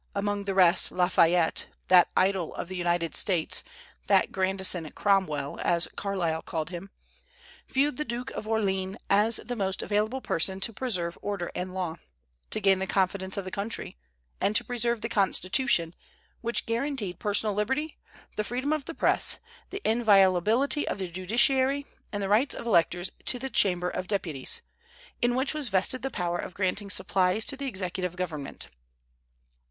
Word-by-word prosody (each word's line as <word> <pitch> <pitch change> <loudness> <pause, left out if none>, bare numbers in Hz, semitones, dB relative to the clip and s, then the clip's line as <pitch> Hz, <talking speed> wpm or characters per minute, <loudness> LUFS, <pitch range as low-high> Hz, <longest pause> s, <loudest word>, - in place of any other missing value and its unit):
among 205 0 -1
the 195 -1 -2
rest 185 -1 +5
Lafayette, 175 -2 +2 0.2
that 180 -1 +6
idol 190 -3 +1
of - - -5
the 185 - -5
United 175 -2 0
States, 180 -6 +1 0.4
that - - +3
"Grandison 190 -3 +2
Cromwell," 190 -8 0
as 170 0 +2
Carlyle 175 -5 -1
called 160 +1 -4
him, 180 +2 -7 0.8
viewed 275 +1 +1
the 300 - -1
Duke 245 -1 -5
of - - -6
Orléans 195 -3 0 0.2
as 210 +3 +4
the 245 +2 -3
most 195 -3 -1
available 215 +5 0
person 190 -4 -1
to 230 - 0
preserve 185 -9 0
order 200 -4 -3
and 185 +1 -5
law, 175 -3 -3 0.5
to - - 0
gain 195 -1 +4
the 190 - -2
confidence 190 0 0
of 195 - -3
the 185 - -6
country, 205 - -4 0.5
and 210 - +1
to - - +3
preserve 235 -2 -1
the 230 - -2
Constitution, 195 -3 +1 0.5
which 235 0 -1
guaranteed 230 - -2
personal 210 0 0
liberty, 265 +10 -2 0.4
the 210 - +1
freedom 255 +7 -1
of 305 -3 -2
the 330 - -7
Press, - - +3 0.3
the 400 +1 -4
inviolability 220 - +3
of - - -2
the 190 -2 -4
judiciary, 260 +9 +2 0.3
and 205 -1 -2
the - - -1
rights 220 +8 +3
of - - -7
electors 175 -3 +2
to 250 - 0
the 265 +2 -5
Chamber 180 -2 +2
of 185 0 -4
Deputies, 165 -10 -2 0.6
in 240 0 +2
which 265 +3 +2
was 300 -5 -2
vested 195 +6 +1
the 270 - -2
power 175 -6 -2
of 180 - -6
granting 200 +1 -1
supplies 190 +2 +1
to 280 - -1
the 275 0 -4
executive 185 -4 -3
government. 160 -6 -4
195 Hz, 165 wpm, -27 LUFS, 180-235 Hz, 0.8 s, that